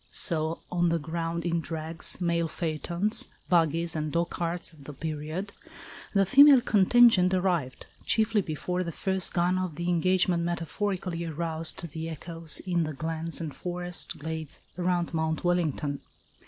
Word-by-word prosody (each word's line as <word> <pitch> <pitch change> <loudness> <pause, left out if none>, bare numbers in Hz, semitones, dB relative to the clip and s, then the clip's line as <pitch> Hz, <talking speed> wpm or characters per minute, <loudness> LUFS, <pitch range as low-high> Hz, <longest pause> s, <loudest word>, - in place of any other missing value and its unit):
So 160 0 -1
on 175 -1 +2
the 170 - +2
ground 165 +2 -3
in 170 -1 +1
drags, 160 +1 -4
mail 170 -2 +1
phaetons, 170 +5 -2 0.2
buggies 165 -1 +2
and 155 -1 -2
dogcarts 170 +1 -2
of 145 -3 -16
the 150 - -7
period, 155 +6 -4 0.6
the 195 0 +5
female 275 +5 +8
contingent 205 -3 +5
arrived, 175 -8 -1 0.2
chiefly 220 -1 +2
before 180 +2 -3
the 170 -2 -3
first 190 +2 0
gun 180 +1 +1
of 185 -4 -3
the 175 +3 -2
engagement 180 0 +2
metaphorically 175 +1 -2
aroused 165 +1 -2
the 160 +1 -4
echoes 165 0 -3
in 175 -2 +1
the 155 -1 -3
glens 160 +3 -2
and 160 -4 -4
forest 180 -1 -3
glades 160 0 -5 0.2
around 175 -1 0
Mount 160 -1 -1
Wellington. 160 -5 0
170 Hz, 140 wpm, -28 LUFS, 160-180 Hz, 0.6 s, female